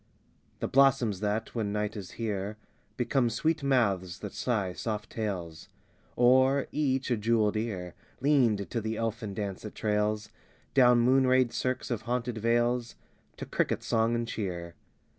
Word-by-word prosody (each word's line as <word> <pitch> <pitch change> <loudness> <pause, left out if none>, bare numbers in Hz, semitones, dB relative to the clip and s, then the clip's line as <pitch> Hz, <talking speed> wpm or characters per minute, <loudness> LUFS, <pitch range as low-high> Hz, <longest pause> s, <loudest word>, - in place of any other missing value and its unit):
V - - -37
The - - 0
blossoms 125 -7 +3
that, 105 +2 -2
when 110 -4 -2
night 105 +1 -2
is 100 -3 -7
here, 105 -2 -3 0.4
Become 120 0 +1
sweet 155 +7 0
mouths 100 -10 +1
that 105 - -6
sigh 105 -7 -1
soft 105 +1 -4
tales; 90 -7 -4 0.5
Or, 130 +3 +4
each, 135 -3 0
a 120 - +2
jeweled 110 -1 +2
ear 95 -6 -3 0.3
Leaned 125 -8 +2
to 115 - -1
the 110 0 -3
elfin 110 -2 -3
dance 100 -2 -4
that 105 - -8
trails 105 0 0 0.4
Down 125 -3 +5
moonrayed 130 -1 +4
cirques 130 0 -2
of 115 -3 -1
haunted 120 -2 -1
vales 120 +1 +1 0.4
To - - -6
cricket - - -1
song 115 +1 +1
and 115 0 -2
cheer. 90 -6 -4
115 Hz, 150 wpm, -29 LUFS, 105-125 Hz, 0.5 s, Down